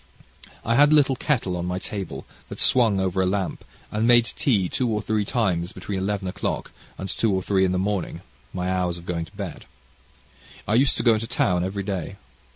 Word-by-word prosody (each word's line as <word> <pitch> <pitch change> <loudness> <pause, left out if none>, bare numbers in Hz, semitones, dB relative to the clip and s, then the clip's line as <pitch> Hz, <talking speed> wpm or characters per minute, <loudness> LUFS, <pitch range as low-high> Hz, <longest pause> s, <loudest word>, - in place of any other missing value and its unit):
I 115 - +2
had 145 +1 +6
a - - +7
little 140 -3 +4
kettle 120 -9 0
on 90 0 -3
my 90 0 -2
table, 95 -8 -6 0.2
that - - -8
swung 115 -6 +4
over 95 0 0
a 95 - +2
lamp, 95 0 -2 0.3
and 110 +2 +1
made 120 -1 +6
tea 110 -5 +1
two 125 +6 -1
or 105 -1 0
three 105 0 -1
times 95 -6 0
between 100 -2 -4
eleven 100 0 -2
o'clock 95 +1 -3 0.3
and 95 - -5
two 110 +3 0
or 95 -1 0
three 95 -1 +2
in 90 - +1
the 90 - 0
morning, 95 -1 -2 0.3
my 90 -1 -3
hours 90 -2 0
of 85 - -11
going 85 -2 -2
to 100 - -19
bed. 95 -7 -6 1.0
I 105 - +1
used 130 +4 +3
to - - -1
go 115 - +6
into 110 +1 -2
town 90 -7 +1
every 100 +2 -3
day. 95 -2 -4
100 Hz, 210 wpm, -24 LUFS, 90-110 Hz, 1.0 s, a